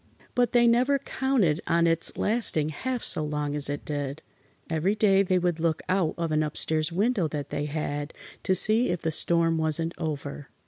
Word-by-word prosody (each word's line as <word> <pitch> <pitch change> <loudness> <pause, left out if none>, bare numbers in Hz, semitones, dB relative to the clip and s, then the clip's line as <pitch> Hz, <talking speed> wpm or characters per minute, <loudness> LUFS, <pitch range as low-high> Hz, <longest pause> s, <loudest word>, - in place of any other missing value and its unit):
But 245 -2 +2
they 240 -1 +4
never 250 +4 +3
counted 255 - 0
on 170 0 +3
its 165 0 +1
lasting 210 -9 +1
half 250 - -4
so 155 - +2
long 150 -1 -2
as 145 -1 -1
it 145 - -4
did. 145 0 -4 0.4
Every 165 +6 0
day 195 -2 +4
they 185 -1 +1
would 175 -2 0
look 165 -1 0
out 185 -4 +1
of 165 -2 -2
an 155 0 +2
upstairs 155 +1 -1
window 200 0 +1
that 150 -1 -5
they 145 - -2
had, 145 0 -3 0.3
to 190 - +1
see 220 +6 +2
if 175 -1 -2
the 160 - 0
storm 165 +1 +2
wasn't 160 +1 -1
over. 145 -3 -5
165 Hz, 185 wpm, -26 LUFS, 150-195 Hz, 0.4 s, they